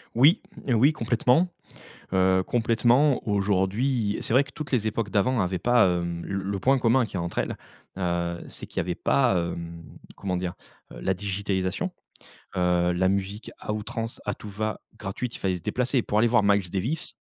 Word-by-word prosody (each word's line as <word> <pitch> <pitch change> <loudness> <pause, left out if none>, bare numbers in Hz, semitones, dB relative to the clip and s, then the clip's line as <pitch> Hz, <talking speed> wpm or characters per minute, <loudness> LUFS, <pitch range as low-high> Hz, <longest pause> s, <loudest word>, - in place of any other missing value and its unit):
Oui, 140 +9 +6 0.3
oui, 130 +4 +4
complètement, 125 +6 +2 0.6
heu, 95 0 +3
complètement, 120 +5 +3
aujourd'hui 100 +3 +1
c'est - - -1
vrai 130 - +6
que - - -15
toutes 150 -3 -7
les 110 -4 +1
époques 105 -2 -2
d'avant 120 +3 +2
avaient 90 -1 -1
pas, 120 -3 +4
hem, 85 -1 -2
l - - -6
le 95 0 -2
point 135 +6 +3
commun 125 +1 +3
qu'il 105 - -10
y - - 0
a 85 - -1
entre 85 0 -5
elles, - - -1 0.4
heu, 85 -1 -1
c'est - - -7
qu'il - - -18
y - - +3
avait 90 0 -1
pas, 125 -9 +2
hem, 85 -1 -4 0.3
comment 95 -2 -3
dire? 90 -1 -3 0.4
Heu, - - -9
la 95 - +1
digitalisation, 95 -1 -2 0.7
heu, 90 -1 +2
la 95 +1 +2
musique 100 +2 -3
à 105 - -3
outrance, 115 +2 -5
à - - -1
tout 105 - -10
va, 110 +2 -3 0.2
gratuite. 110 +4 -4
Il - - -12
fallait 95 -2 0
se - - -9
déplacer. 125 - 0
Pour 105 -2 -1
aller 120 +2 +4
voir 120 -1 +4
Miles 100 -3 +2
Davis, 115 - -2
100 Hz, 190 wpm, -26 LUFS, 95-120 Hz, 0.7 s, Oui